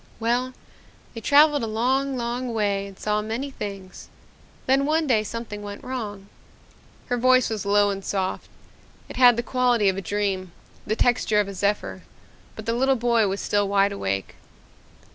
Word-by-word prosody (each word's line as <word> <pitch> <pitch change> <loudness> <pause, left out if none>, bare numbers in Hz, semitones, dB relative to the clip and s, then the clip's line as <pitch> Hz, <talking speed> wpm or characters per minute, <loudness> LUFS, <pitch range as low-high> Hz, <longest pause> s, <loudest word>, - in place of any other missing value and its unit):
"Well, 245 +3 0 0.6
they 225 - -7
traveled 290 +2 +5
a 225 - -2
long, 260 +5 0
long 240 0 -3
way 200 -2 0
and 195 -1 -13
saw 210 0 -1
many 230 +6 -4
things. 195 -6 -8 0.6
Then 270 +2 +2
one 315 +1 +2
day 240 -6 +3
something 220 -1 -6
went 205 0 -8
wrong." 210 -6 -6 0.8
Her 245 - -1
voice 255 0 +3
was 210 -2 -3
low 205 0 +4
and 195 0 -5
soft. 190 -1 -3 0.6
It - - -8
had 245 -2 +6
the 235 - -1
quality 245 -5 +2
of 190 - -2
a - - -2
dream, 190 -1 -2 0.3
the 215 - 0
texture 225 -3 +2
of 205 - +1
a 200 - -6
zephyr, 200 +2 -2 0.5
but - - -8
the 230 - 0
little 265 +3 +2
boy 235 -3 +2
was 195 +1 -3
still 205 -1 +1
wide 200 0 +2
awake. 100 - -3
220 Hz, 170 wpm, -24 LUFS, 200-250 Hz, 0.8 s, had